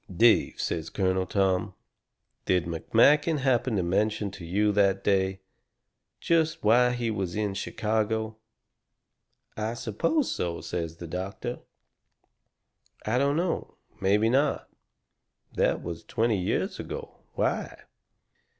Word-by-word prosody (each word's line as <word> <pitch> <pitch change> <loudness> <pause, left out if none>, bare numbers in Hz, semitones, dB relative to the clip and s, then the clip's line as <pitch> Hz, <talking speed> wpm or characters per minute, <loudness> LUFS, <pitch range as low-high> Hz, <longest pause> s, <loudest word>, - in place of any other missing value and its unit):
"Dave," 115 +6 +4
says 80 -1 -2
Colonel 95 -1 0
Tom, 95 0 0 0.7
"did 90 -2 +2
McMakin 140 - +3
happen 130 -3 +1
to 95 - +1
mention 100 +3 0
to 90 - -10
you, 105 +5 +1
that 100 -1 +2
day, 95 -1 +1 0.8
just 160 -2 +1
why 120 +4 +5
he 120 -2 -1
was 95 -5 -3
in 105 -2 -1
Chicago?" 110 +2 -1 1.2
"I 110 +2 -2
suppose 120 - 0
so," 85 -1 -2
says 85 0 -4
the 85 - -7
doctor. 95 +8 -5 1.5
"I 115 +4 +1
don't 140 +1 +2
know. 170 +1 -2 0.2
Maybe 105 +3 +3
not. 135 +5 +1 0.8
That - - +1
was 85 -1 -6
twenty 110 -3 0
years 90 - -1
ago. - - -7
Why?" - - -2
105 Hz, 115 wpm, -27 LUFS, 95-120 Hz, 1.5 s, why